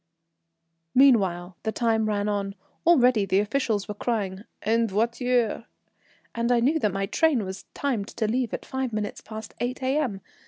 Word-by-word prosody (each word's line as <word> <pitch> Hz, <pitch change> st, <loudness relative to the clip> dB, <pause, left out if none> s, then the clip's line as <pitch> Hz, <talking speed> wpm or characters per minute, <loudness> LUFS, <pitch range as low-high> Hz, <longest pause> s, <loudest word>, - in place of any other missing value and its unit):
Meanwhile 190 Hz, -10 st, +4 dB
the 220 Hz, -, -1 dB
time 225 Hz, -2 st, +1 dB
ran 205 Hz, -1 st, 0 dB
on. 200 Hz, -1 st, -2 dB, 0.3 s
Already 250 Hz, -10 st, +5 dB
the 190 Hz, -, +2 dB
officials 215 Hz, -1 st, 0 dB
were 210 Hz, -, -4 dB
crying 205 Hz, -2 st, -2 dB, 0.2 s
"En 230 Hz, +2 st, +2 dB
voiture," 235 Hz, +2 st, 0 dB, 0.7 s
and 235 Hz, +1 st, 0 dB
I 240 Hz, -, +4 dB
knew 285 Hz, +7 st, +2 dB
my 195 Hz, +1 st, -1 dB
train 270 Hz, -, +2 dB
was 190 Hz, +1 st, -7 dB
timed 240 Hz, -8 st, -1 dB
to 220 Hz, -, -2 dB
leave 240 Hz, +1 st, 0 dB
at -, -, -5 dB
five 265 Hz, -3 st, -3 dB
minutes 210 Hz, -1 st, -3 dB
past 215 Hz, -1 st, -8 dB
8 250 Hz, +2 st, -3 dB
A.M. 260 Hz, -7 st, 0 dB
225 Hz, 155 wpm, -26 LUFS, 205-250 Hz, 0.7 s, Already